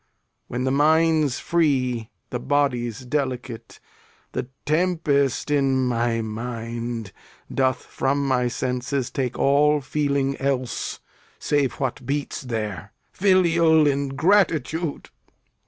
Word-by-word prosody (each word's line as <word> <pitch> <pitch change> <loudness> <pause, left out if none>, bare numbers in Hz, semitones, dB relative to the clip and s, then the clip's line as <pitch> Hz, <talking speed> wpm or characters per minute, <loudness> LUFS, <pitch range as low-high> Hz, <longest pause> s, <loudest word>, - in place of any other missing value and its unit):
When 125 +1 -3
the 130 - +1
mind's 155 -1 +3
free, 130 -9 +1 0.2
The 125 - -2
body's 125 -4 0
delicate. 125 -3 -4 0.5
The - - -3 0.2
tempest 155 -4 +1
in 135 -2 +2
my 115 -2 0
mind 115 0 -5 0.4
Doth 130 -1 +1
from 140 +1 -1
my 125 -2 +2
senses 125 +1 -2
take 130 -2 -2
all 150 +2 +4
feeling 140 0 -1
else 130 -2 -2 0.4
Save 145 -3 +1
what 130 0 -3
beats 140 +3 -3
there. 110 -5 -4 0.2
Filial 170 -5 +4
ingratitude! 155 +2 +1
135 Hz, 100 wpm, -23 LUFS, 125-150 Hz, 0.5 s, all